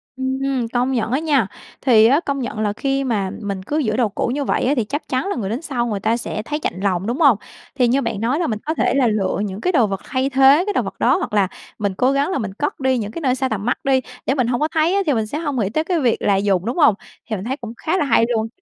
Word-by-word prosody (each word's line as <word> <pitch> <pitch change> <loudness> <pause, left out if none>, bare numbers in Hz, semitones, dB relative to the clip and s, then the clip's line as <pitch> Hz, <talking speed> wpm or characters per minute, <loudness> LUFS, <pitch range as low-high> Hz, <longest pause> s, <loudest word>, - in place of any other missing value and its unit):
Ừm, 265 -1 -1
công 245 +2 +1
nhận 235 -2 -1
á 265 - +2
nha. 285 -10 +2 0.3
Thì 225 -4 +5
á, 275 +6 +5
công 280 -4 -3
nhận 240 -4 -4
là 205 -1 0
khi 275 +3 -1
mà 210 -7 -1
mình 200 -2 -4
cứ 295 +10 -2
giữ 225 -7 0
đồ 235 -4 +2
cũ - - -2
như 285 0 -1
vậy - - 0
á, 275 - +3
thì 240 - +1
chắc 285 +8 -5
chắn 260 +6 -1
là 400 - -1
người 200 -5 -3
đến 240 +8 -3
sau 255 -7 -2
người 205 -3 -2
ta 220 +3 +1
sẽ 220 -2 -4
thấy 300 +1 -2
chạnh 185 - -3
lòng, 190 0 0
đúng 245 +6 -2
hông? 270 -9 +6 0.4
Thì 250 -3 +3
như 265 +4 +2
bạn 230 -4 -3
nói 250 +7 +1
là 340 - 0
mình 215 -2 -2
có 315 - 0
thể - - +1
là 260 -4 +3
lựa 200 -4 0
những 195 +2 -6
cái 365 - +1
đồ 245 - +3
vật 195 -1 -4
thay 260 0 -1
thế 270 +4 +5
cái 415 - -1
đồ - - +2
vật - - -6
đó, - - +3
hoặc 365 - -4
là 200 -3 +3 0.3
mình 200 -2 -1
cố 255 +2 +3
gắng 280 +6 +1
là - - 0
mình 210 -6 -4
cất 290 +9 -3
đi 260 -1 +1
những 210 -2 -3
cái 335 - -6
nơi 260 -2 +1
xa 265 0 -1
tầm 210 -2 -3
mắt 245 - +1
đi, 265 -1 +2 0.2
để 270 - +1
mình 250 -4 +1
hông 240 -1 0
có 305 - +3
thấy 320 +4 +1
á 400 - +3
thì 295 - +2
mình 220 -3 -1
sẽ 290 - -4
hông 290 -6 -2
nghĩ 200 -2 0
tới 310 +8 0
cái 345 -1 0
việc 245 -5 +1
là 200 - +3
dùng, 195 -2 +1
đúng 240 +7 -2
hông? 290 - +6 0.4
Thì 215 - -1
mình 190 +2 -6
thấy 265 +3 -2
cũng 230 -3 -8
khá 345 +4 -1
là 295 - +1
hay 230 -3 +4
luôn. 220 0 0
250 Hz, 315 wpm, -20 LUFS, 215-280 Hz, 0.4 s, hông